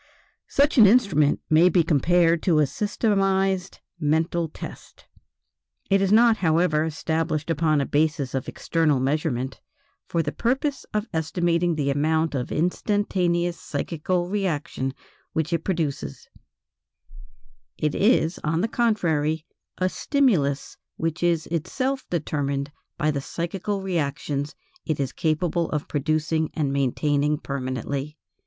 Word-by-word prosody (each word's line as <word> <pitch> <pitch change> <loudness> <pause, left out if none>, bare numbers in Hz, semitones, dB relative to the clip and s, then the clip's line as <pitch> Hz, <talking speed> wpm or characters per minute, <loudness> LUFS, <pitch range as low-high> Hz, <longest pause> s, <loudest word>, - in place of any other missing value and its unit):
Such 280 -1 +3
an 215 - +9
instrument 190 - +3
may 160 +3 +5
be 175 0 +3
compared 165 +2 +3
to 170 -4 +2
a 150 - +5
systematized 195 - 0 0.2
"mental 160 +2 +1
test." - - -10 0.9
It 195 0 +4
is 195 0 +1
not, 225 +1 +6
however, 160 -3 +2
established 160 0 -1
upon 155 -1 +2
a 140 - 0
basis 150 -2 0
of 135 -1 -2
external 160 -5 +1
measurement, 135 -2 -1 0.5
for 165 -1 0
the 145 - -2
purpose 270 +4 -1
of 210 +1 -1
estimating 170 +1 +1
the 140 -2 0
amount 155 +3 +1
of 125 -3 -3
instantaneous 175 -1 0
psychical 175 +4 -2
reaction 155 -9 -2 0.4
which 160 +2 -1
it 165 -1 0
produces; 145 - -3 1.5
it 150 -1 0
is, 190 -6 +2
on 160 +2 0
the 225 - +1
contrary, 165 -10 0 0.3
a 185 - +1
stimulus 185 - +1 0.2
which 165 +1 -2
is 170 -2 +1
itself 255 - -2
determined 145 -4 -2 0.3
by 155 +1 +1
the 140 -2 -2
psychical 190 +6 -3
reactions 145 -4 -2 0.3
it 155 -3 -2
is 135 -2 -2
capable 165 +1 0
of 150 -1 -3
producing 155 +2 0
and 145 -4 0
maintaining 145 +2 +1
permanently. 135 +2 -4
160 Hz, 125 wpm, -24 LUFS, 145-180 Hz, 1.5 s, an